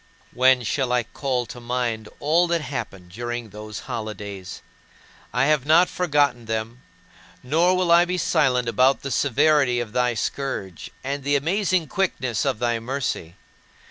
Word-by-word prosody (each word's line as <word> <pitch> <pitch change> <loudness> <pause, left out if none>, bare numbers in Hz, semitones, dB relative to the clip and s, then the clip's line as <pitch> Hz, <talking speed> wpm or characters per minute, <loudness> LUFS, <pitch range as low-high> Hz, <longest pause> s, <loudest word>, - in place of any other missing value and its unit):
12. - - -27
When 130 0 +4
shall 125 +5 -1
I 125 -1 +2
call 125 +2 -2
to 120 - -9
mind 120 -2 -2
all 165 +4 +3
that 170 -1 0
happened 95 -11 -6
during 120 +1 -5
those 105 0 -8
holidays? 100 -4 -6 0.7
I 125 +4 +2
have 150 -2 +2
not 160 +5 +5
forgotten 145 -8 +1
them; 110 +2 -4 0.6
nor 170 +8 +2
will 180 -2 +1
I 170 +1 +7
be 180 +1 -2
silent 130 -7 +2
about 130 +4 +3
the 135 - -4
severity 140 -1 +3
of 115 -3 -5
thy 125 -1 +1
scourge, 105 -6 -4
and 140 +1 -3
the 145 +1 +1
amazing 180 +4 +1
quickness 130 - -1
of - - 0
thy 120 0 0
mercy. 115 -9 -3
125 Hz, 155 wpm, -23 LUFS, 115-150 Hz, 0.7 s, I